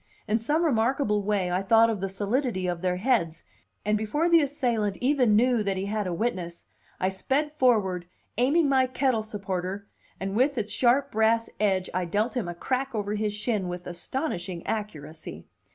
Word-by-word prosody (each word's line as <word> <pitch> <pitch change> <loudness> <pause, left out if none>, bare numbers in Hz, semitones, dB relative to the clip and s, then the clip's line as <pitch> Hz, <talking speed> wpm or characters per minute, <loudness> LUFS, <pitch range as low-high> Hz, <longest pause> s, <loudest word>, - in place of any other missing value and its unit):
In 220 +2 +2
some 300 +9 +1
remarkable 230 -5 +1
way 200 -3 0
I 180 +1 +1
thought 225 +3 +5
of 210 -4 -4
the 195 - -2
solidity 205 +1 -1
of 175 -1 -2
their 180 -1 0
heads, 180 -6 0 0.4
and 210 0 +2
before 295 +11 0
the 335 -1 +6
assailant 240 -8 0
even 250 -5 +3
knew 240 +1 +3
that 195 -2 -1
he 190 - -2
had 210 -1 -2
a - - -2
witness, 175 -3 -3 0.3
I 185 - +1
sped 270 +10 -1
forward, 210 - +2 0.3
aiming 285 +7 +3
my 265 -2 +3
kettle 255 -2 +1
supporter, 200 -2 -4 0.3
and 195 +1 -3
with 265 +4 +2
its 215 -2 -2
sharp 265 +3 +2
brass 225 +1 +2
edge 190 -3 +1
I 180 0 0
dealt 210 +9 -1
him 235 -8 -1
a 175 - -5
crack 260 +6 -2
over 205 -1 -2
his 210 0 -1
shin 210 -3 -1
with 180 0 -6
astonishing 180 - -4
accuracy. 155 - -5
210 Hz, 180 wpm, -27 LUFS, 185-250 Hz, 0.4 s, the